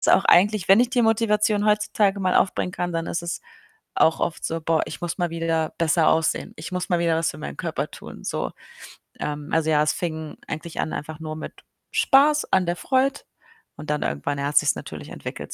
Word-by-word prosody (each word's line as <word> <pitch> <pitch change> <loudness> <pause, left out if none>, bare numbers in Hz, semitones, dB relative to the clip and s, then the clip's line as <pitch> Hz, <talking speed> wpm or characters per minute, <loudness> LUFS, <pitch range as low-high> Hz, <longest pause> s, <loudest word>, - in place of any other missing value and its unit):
Ist - - -1
auch - - +5
eigentlich, 200 +1 +4
wenn 195 +4 +7
ich 245 - +3
die 250 -2 +2
Motivation 210 -2 +2
heutzutage 210 -1 +2
mal 185 -1 +1
aufbringen 180 -1 +1
kann, 175 -1 -2
dann 165 0 -2
ist 170 - -3
es 170 0 -4 0.6
auch 160 - +3
oft 170 - -2
so: 165 0 -2
„Boah, 160 0 +1
ich - - -7
muss 175 +1 -3
mal 175 -1 0
wieder 165 -1 -1
besser 165 0 +3
aussehen. 160 0 +1
Ich 155 - -7
muss 180 0 -3
mal 175 - +2
wieder 170 -1 +2
was 165 - 0
für - - -12
meinen 70 -1 -6
Körper - - -3
tun - - -11
so.“ - - -2 0.7
Ähm, 150 0 -4
also, 160 -1 +2
ja, 150 -1 +4
es 150 - +1
fing 160 -3 -4
eigentlich 165 +1 -6
an - - -3
einfach 155 +1 -6
nur 155 -1 -5
mit - - -7 0.4
Spaß 295 +2 +4
an 185 -1 +3
der 175 0 -1
Freud 265 +4 +1 0.6
und 150 - -9
dann 150 0 0
irgendwann 105 - -2
hat 145 +1 0
sich's - - +4
natürlich - - -8
entwickelt - - -7
170 Hz, 210 wpm, -24 LUFS, 155-205 Hz, 0.7 s, wenn